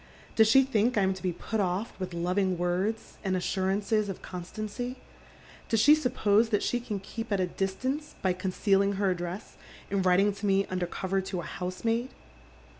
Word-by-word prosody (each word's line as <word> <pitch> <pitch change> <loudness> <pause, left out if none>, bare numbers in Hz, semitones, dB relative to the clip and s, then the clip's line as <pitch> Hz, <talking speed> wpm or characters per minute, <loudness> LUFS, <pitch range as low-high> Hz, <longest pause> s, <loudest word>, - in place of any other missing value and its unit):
"Does 220 -1 +6
she 270 +5 +7
think 240 -2 +1
I 200 - +4
am 190 0 +2
to 185 - -10
be 185 - 0
put 220 +6 -3
o££ 190 +2 0
with 185 -2 -4
loving 180 +2 +1
words 185 +6 -2
and 190 -2 +1
assurances 200 +3 0
of 195 - -6
constancy? 215 +7 -5 0.7
Does 225 - +2
she 290 +8 +7
suppose 230 -7 +3
that 210 -2 +1
she 245 - 0
can 215 -4 -4
keep 225 +4 -6
me 205 - +2
at - - -1
a 185 - +2
distance 255 - -3
by 185 -1 +3
concealin.s: 195 +1 +1
her 195 -1 +2
address 175 +2 -5 0.3
and 200 -1 +1
writing 190 +3 +4
to 200 +1 -4
me 195 0 +3
under 180 -1 -1
cover 190 +2 -1
to 190 -1 -4
a - - -9
housemaid 225 +7 -2
195 Hz, 190 wpm, -29 LUFS, 185-220 Hz, 0.7 s, she